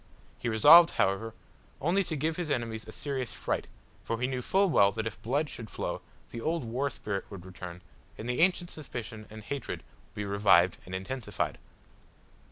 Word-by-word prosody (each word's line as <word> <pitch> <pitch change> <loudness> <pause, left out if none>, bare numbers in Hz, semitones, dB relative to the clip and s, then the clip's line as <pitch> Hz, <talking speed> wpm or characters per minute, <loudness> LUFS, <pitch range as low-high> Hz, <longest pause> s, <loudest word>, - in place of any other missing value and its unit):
He 120 - -2
resolved, 150 +10 +9
however, 110 +4 +1 0.4
only 180 +6 +2
to 160 - -2
give 155 +3 0
his 175 -2 -3
enemies 115 -5 -2
a - - -7
serious 130 -2 -3
fright, - - -2 0.4
for 115 - -2
he 125 - +1
knew 130 -1 -2
full 195 +9 +3
well 100 -7 +5
that 110 +2 -3
if 110 - -5
blood 145 +7 0
should 115 -6 -8
flow, - - -4 0.3
the 115 - -6
old 165 +3 -1
war 125 +5 -1
spirit 100 -6 -4
would 95 -3 -9
return, 90 -1 -9 0.3
and 110 - -6
the 125 0 -1
ancient 175 -1 +3
suspicion 120 -7 -7
and 110 0 -10
hatred 140 +6 -5 0.3
be 105 -1 -3
revived 100 -3 +4
and 90 - -5
intensified. 105 +1 -3
115 Hz, 175 wpm, -30 LUFS, 105-145 Hz, 0.4 s, resolved